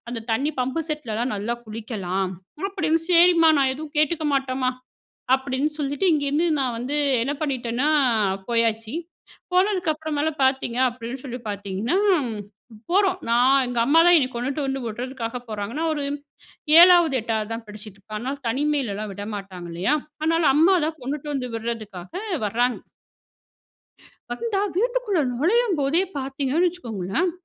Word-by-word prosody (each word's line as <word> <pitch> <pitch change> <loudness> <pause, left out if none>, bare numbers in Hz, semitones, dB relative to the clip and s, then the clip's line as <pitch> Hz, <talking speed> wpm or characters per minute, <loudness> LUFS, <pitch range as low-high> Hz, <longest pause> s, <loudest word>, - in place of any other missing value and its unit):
அந்த 235 -1 -4
தண்ணி 280 +7 0
பம்பு 265 +6 -1
செட்லலாம் 250 -5 -2
நல்லா 220 +4 -2
குளிக்கலாம். 200 -4 -3 0.4
அப்டின்னு, 330 -5 0
"சேரிம்மா! 340 -1 +6
நான் 265 -1 +3
எதுவும் 310 +2 -9
கேட்டுக்க 310 +1 +1
மாட்டேன்மா." 260 -1 0 0.7
அப்டின்னு 265 +3 -2
சொல்லிட்டு 285 +6 -1
இங்கேருந்து 295 +3 +1
நான் 250 -3 -1
வந்து 275 +5 -2 0.2
என்ன 275 - -1
பண்ணிட்டேனா, 255 -1 -1 0.6
போயாச்சு. 225 0 0 0.6
போனதுக்கு 365 -3 +2
அப்புறமேலாம் 310 -1 -3
பார்த்தீங்க 265 -2 0
அப்டின்னு 245 +1 -7
சொல்லி 245 -1 -5
பார்த்தீங்கன்னா, 200 - -2 0.9
போறோம் 375 0 +3
நான் 255 +3 +4
எங்க 245 -1 -3
அம்மாதான் 330 +4 +6
என்ன 260 -3 +1
கொண்டுட்டு 270 +5 -2
வந்து 270 0 -2
விடுறதுக்காக 240 +1 -5
போறாங்க. 210 0 -4
நான் 325 0 0
ஒரு 290 -2 -3 0.7
7, 345 -4 +7
8 220 -1 -2
தான் 225 0 -5
படிச்சிட்டுருப்பேன், 210 0 -10
அதனால 265 +5 -4
தனிமையிலலாம் 245 -6 -1
விடமாட்டாங்க 195 -3 -7
இல்லையா? 185 - +1 0.3
அதனால 330 +1 +2
அம்மா 335 +6 +5
தான் 320 0 -4
கொண்டுட்டு 290 +3 -4
வந்து 250 -2 -2
விடுறதுக்காக 220 -6 -5 0.4
வர்ராங்க. 240 +4 0 1.5
வந்தா, 440 -4 -1 0.2
வீட்டுக்குள்ள 480 -4 +1 0.2
நுழையும் 410 - +2
போதே 285 +6 +2 0.2
பார்த்தீங்கன்னு 275 +5 0
வச்சுக்கோங்களேன், 275 - -2
265 Hz, 125 wpm, -23 LUFS, 230-315 Hz, 1.5 s, 7